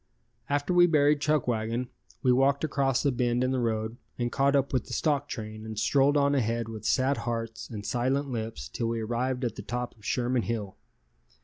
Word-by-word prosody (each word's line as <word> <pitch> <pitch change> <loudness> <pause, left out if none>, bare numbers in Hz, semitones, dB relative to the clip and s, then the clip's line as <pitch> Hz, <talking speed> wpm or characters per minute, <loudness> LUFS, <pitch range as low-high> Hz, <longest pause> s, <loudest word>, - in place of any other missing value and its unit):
After 145 +5 0
we 175 0 +7
buried 150 -2 +4
Chuckwagon 120 -5 0 0.4
we 125 - +4
walked 135 +3 +3
across 135 -3 +1
a 140 - +4
bend 120 0 +1
in 130 - +1
the 130 - 0
road 110 -1 -1 0.2
and 120 -1 -1
caught 140 +2 +2
up 140 0 +1
with 125 -3 +1
the - - -8
stock 145 -2 +1
train 110 -1 -6
and 110 -1 -7
strolled 135 +6 +3
on 140 0 +3
ahead 115 -3 0
with 110 -1 -7
sad 135 +2 +2
hearts 115 -1 -4
and 105 -3 -6
silent 130 +4 0
lips 110 - -4
till 115 - -3
we 115 0 -1
arrived 125 +3 -1
at 120 - -3
the - - -4
top 125 0 -4
of 105 - -23
Sherman 125 +2 0
Hill. 110 -4 -3
125 Hz, 200 wpm, -28 LUFS, 115-140 Hz, 0.4 s, we